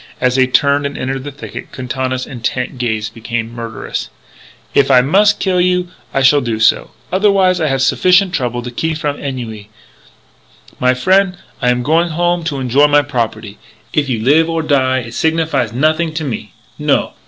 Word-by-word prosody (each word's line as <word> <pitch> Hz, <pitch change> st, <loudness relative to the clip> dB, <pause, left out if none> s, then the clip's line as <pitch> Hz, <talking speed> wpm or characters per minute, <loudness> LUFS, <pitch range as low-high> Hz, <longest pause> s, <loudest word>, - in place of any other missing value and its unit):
As 125 Hz, 0 st, +2 dB
they 130 Hz, -1 st, +3 dB
turned 140 Hz, +2 st, +2 dB
and 140 Hz, -, -8 dB
entered 130 Hz, +1 st, -3 dB
the 145 Hz, -, -5 dB
thicket, 140 Hz, +2 st, -9 dB
Quintana's 130 Hz, 0 st, -3 dB
intent 125 Hz, +1 st, -4 dB
gaze 110 Hz, -3 st, -1 dB
became 115 Hz, +1 st, -5 dB
murderous. 115 Hz, -2 st, -5 dB, 0.6 s
"If -, -, +3 dB
I 125 Hz, -, +6 dB
mus' 195 Hz, +11 st, +4 dB
kill 190 Hz, -3 st, 0 dB
you 180 Hz, 0 st, +1 dB, 0.2 s
I 135 Hz, -, 0 dB
shall 145 Hz, +2 st, +5 dB
do 115 Hz, -3 st, -2 dB
so. 110 Hz, -, +3 dB, 0.2 s
Otherwise 190 Hz, -2 st, +3 dB
I 155 Hz, -, +1 dB
have 135 Hz, -2 st, 0 dB
sufficient 185 Hz, +6 st, +3 dB
trouble 120 Hz, -5 st, -2 dB
to 120 Hz, -, -6 dB
keep 160 Hz, +6 st, -2 dB
me -, -, -5 dB
from 145 Hz, -2 st, -3 dB
ennui. 115 Hz, -7 st, -6 dB, 1.1 s
My 125 Hz, 0 st, +2 dB
frien', 185 Hz, +7 st, +2 dB, 0.2 s
I 125 Hz, -, +2 dB
am 125 Hz, 0 st, +1 dB
going 165 Hz, +5 st, +2 dB
home 175 Hz, +1 st, 0 dB
to 145 Hz, -4 st, -2 dB
enjoy 135 Hz, +3 st, +3 dB
my 145 Hz, 0 st, +4 dB
property. 115 Hz, -6 st, -4 dB, 0.3 s
If 145 Hz, -2 st, 0 dB
you 120 Hz, -3 st, -1 dB
live 160 Hz, +6 st, +4 dB
or 165 Hz, -1 st, -1 dB
die 130 Hz, -4 st, +1 dB
it 115 Hz, -1 st, -9 dB
signifies 160 Hz, -6 st, 0 dB
nothing 155 Hz, +5 st, 0 dB
to 160 Hz, -, -2 dB
me. 115 Hz, -7 st, -5 dB, 0.3 s
No! -, -, +1 dB
135 Hz, 180 wpm, -16 LUFS, 125-160 Hz, 1.1 s, I